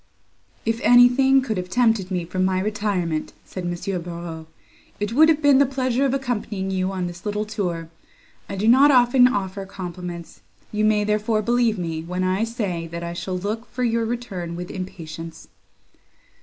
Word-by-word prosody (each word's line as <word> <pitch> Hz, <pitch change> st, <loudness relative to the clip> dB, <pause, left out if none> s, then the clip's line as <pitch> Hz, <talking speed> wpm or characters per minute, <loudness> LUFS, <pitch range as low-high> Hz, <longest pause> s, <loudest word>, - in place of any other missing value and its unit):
"If 225 Hz, +1 st, -1 dB
anything 255 Hz, +2 st, +6 dB
could 220 Hz, -6 st, -2 dB
have 180 Hz, 0 st, -4 dB
tempted 225 Hz, -4 st, +2 dB
me 180 Hz, -3 st, -2 dB
from 185 Hz, +2 st, -2 dB
my 185 Hz, 0 st, +1 dB
retirement," 190 Hz, -6 st, -2 dB
said 185 Hz, -2 st, -6 dB
M. 175 Hz, +1 st, -3 dB
Barreaux, 170 Hz, -2 st, -7 dB, 0.5 s
"it 205 Hz, +2 st, -2 dB
would 315 Hz, +5 st, +6 dB
have 310 Hz, -1 st, +2 dB
been 285 Hz, -2 st, +6 dB
the 280 Hz, -, +6 dB
pleasure 260 Hz, 0 st, 0 dB
of 270 Hz, -, +1 dB
accompanying 210 Hz, -7 st, -3 dB
you 190 Hz, 0 st, -1 dB
on 185 Hz, -2 st, -2 dB
this 175 Hz, 0 st, -7 dB
little 210 Hz, 0 st, -2 dB
tour. 180 Hz, -6 st, -3 dB, 0.6 s
I -, -, -4 dB
do 200 Hz, +3 st, -1 dB
not 265 Hz, +5 st, +7 dB
often 250 Hz, -1 st, +6 dB
offer 195 Hz, -4 st, -2 dB
compliments; 180 Hz, -2 st, -7 dB, 0.3 s
you 215 Hz, 0 st, -1 dB
may, 215 Hz, -1 st, +3 dB
therefore, 215 Hz, +1 st, 0 dB
believe 235 Hz, -1 st, +2 dB
me, 165 Hz, -3 st, -3 dB
when 180 Hz, +3 st, -3 dB
I 185 Hz, +4 st, +1 dB
say, 200 Hz, -8 st, -3 dB
that 170 Hz, +1 st, -6 dB
I 170 Hz, 0 st, -4 dB
shall 180 Hz, +1 st, -4 dB
look 215 Hz, +5 st, -4 dB
for 250 Hz, -, -3 dB
your 230 Hz, -1 st, +1 dB
return 200 Hz, -8 st, -4 dB
with 175 Hz, +1 st, -6 dB
impatience." 165 Hz, -3 st, -8 dB
200 Hz, 175 wpm, -23 LUFS, 180-235 Hz, 0.6 s, not